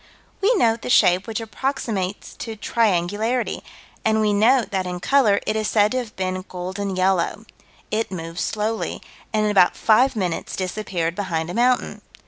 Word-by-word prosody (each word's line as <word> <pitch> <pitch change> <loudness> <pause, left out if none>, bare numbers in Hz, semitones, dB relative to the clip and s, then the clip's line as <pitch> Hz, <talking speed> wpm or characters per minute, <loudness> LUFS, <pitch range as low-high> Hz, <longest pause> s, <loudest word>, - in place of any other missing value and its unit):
We 440 +5 +4
note 230 - +2
the - - -5
shape 185 -5 +4
which 225 0 -3
approximates 220 -4 -3
to 225 -2 -6
triangularity, 215 +2 0 0.4
and 220 0 +2
we 210 -1 +2
note 230 +5 +3
that 190 -2 -1
in 180 0 -4
color 215 -1 +3
it 215 - -1
is 215 -1 0
said 210 0 +3
to 255 - 0
have 230 -4 -7
been 185 0 -2
golden 190 +2 -4
yellow. 190 +3 0 0.5
It 220 +1 0
moved 165 -1 -6
slowly, 220 +3 -2 0.3
and 215 -1 +1
in 210 - +2
about 185 -3 +4
five 250 +4 +4
minutes 180 -5 -2
disappeared 185 -3 -2
behind 175 -4 -3
a - - -6
mountain. 245 +3 +1
210 Hz, 165 wpm, -22 LUFS, 185-225 Hz, 0.5 s, We